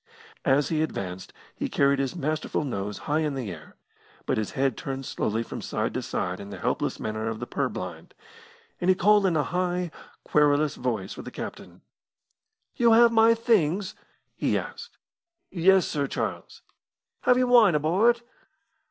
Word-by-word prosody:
As 140 Hz, +1 st, +3 dB
he 155 Hz, -2 st, 0 dB
advanced 95 Hz, -, -4 dB, 0.2 s
he -, -, -3 dB
carried 140 Hz, 0 st, +2 dB
his 135 Hz, +4 st, -2 dB
masterful 155 Hz, -1 st, -2 dB
nose 105 Hz, -6 st, -4 dB
high 150 Hz, +1 st, +1 dB
in 150 Hz, -3 st, -1 dB
the 120 Hz, -7 st, -4 dB
air, 80 Hz, -3 st, -11 dB, 0.5 s
but -, -, 0 dB
his 110 Hz, -, -4 dB
head 135 Hz, -3 st, +1 dB
turned 135 Hz, -1 st, -5 dB
slowly 110 Hz, -1 st, -1 dB
from -, -, -7 dB
side -, -, -2 dB
to -, -, -2 dB
side 90 Hz, +1 st, -3 dB
in 100 Hz, -, -8 dB
the 100 Hz, -, -7 dB
helpless -, -, -2 dB
manner 110 Hz, +1 st, -3 dB
of 110 Hz, -1 st, -5 dB
the 120 Hz, -, -4 dB
purblind, 90 Hz, -, -4 dB, 0.6 s
and 180 Hz, -, 0 dB
he 185 Hz, -, +6 dB
called 205 Hz, +1 st, +4 dB
in 170 Hz, -3 st, +1 dB
a 150 Hz, -, +2 dB
high, 180 Hz, +2 st, -1 dB, 0.3 s
querulous 150 Hz, 0 st, +3 dB
voice -, -, -3 dB
for -, -, -8 dB
the -, -, -8 dB
captain. -, -, -8 dB, 0.9 s
"You 235 Hz, -2 st, +4 dB
have 235 Hz, +1 st, +7 dB
my 225 Hz, 0 st, +5 dB
things?" 200 Hz, -5 st, +1 dB, 0.4 s
he -, -, 0 dB
asked. -, -, -8 dB, 0.5 s
"Yes, 190 Hz, +1 st, +4 dB
Sir 145 Hz, -2 st, -1 dB
Charles." -, -, -5 dB, 0.6 s
"Have 250 Hz, -, +5 dB
you 255 Hz, -, +3 dB
wine 235 Hz, -8 st, +6 dB
aboard?" 200 Hz, +11 st, +2 dB
150 Hz, 165 wpm, -26 LUFS, 125-190 Hz, 0.9 s, have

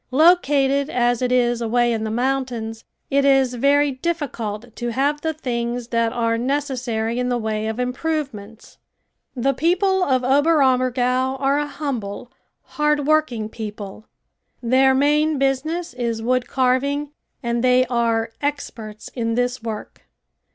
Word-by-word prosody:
Located 280 Hz, -2 st, +3 dB
as 245 Hz, -1 st, +1 dB
it 250 Hz, 0 st, 0 dB
is 240 Hz, -1 st, +2 dB
away 240 Hz, +1 st, +2 dB
in 220 Hz, -1 st, -2 dB
the -, -, -2 dB
mountains, 240 Hz, -2 st, -2 dB, 0.3 s
it 280 Hz, 0 st, +3 dB
is 270 Hz, -2 st, +3 dB
very 280 Hz, +3 st, +3 dB
difficult 245 Hz, -7 st, -4 dB
to 240 Hz, -1 st, -3 dB
have 285 Hz, +5 st, 0 dB
the 320 Hz, -, 0 dB
things 240 Hz, -5 st, -3 dB
that 230 Hz, -1 st, +1 dB
are 230 Hz, -1 st, 0 dB
necessary 245 Hz, -4 st, -1 dB
in 250 Hz, 0 st, 0 dB
the 245 Hz, -, +1 dB
way 220 Hz, -1 st, -2 dB
of 220 Hz, +2 st, -3 dB
improvements. 250 Hz, -5 st, -4 dB, 0.6 s
The 270 Hz, +2 st, +1 dB
people 365 Hz, +6 st, +2 dB
of 260 Hz, -5 st, +1 dB
Oberammergau 260 Hz, -3 st, +2 dB
are 275 Hz, +1 st, +2 dB
a 295 Hz, -, -2 dB
humble, 245 Hz, -7 st, -5 dB, 0.3 s
hard 300 Hz, -1 st, 0 dB
working 295 Hz, -8 st, +1 dB
people. 215 Hz, -1 st, -8 dB, 0.5 s
Their 260 Hz, +2 st, +3 dB
main 300 Hz, +2 st, +2 dB
business 275 Hz, +5 st, -1 dB
is 235 Hz, -2 st, -2 dB
wood 250 Hz, +1 st, +1 dB
carving 280 Hz, +3 st, 0 dB, 0.3 s
and 235 Hz, 0 st, -1 dB
they 255 Hz, 0 st, +4 dB
are 230 Hz, -2 st, 0 dB
experts 230 Hz, -7 st, -5 dB
in 230 Hz, -2 st, -2 dB
this 245 Hz, 0 st, -1 dB
work. 220 Hz, -2 st, -7 dB
255 Hz, 135 wpm, -21 LUFS, 235-280 Hz, 0.6 s, they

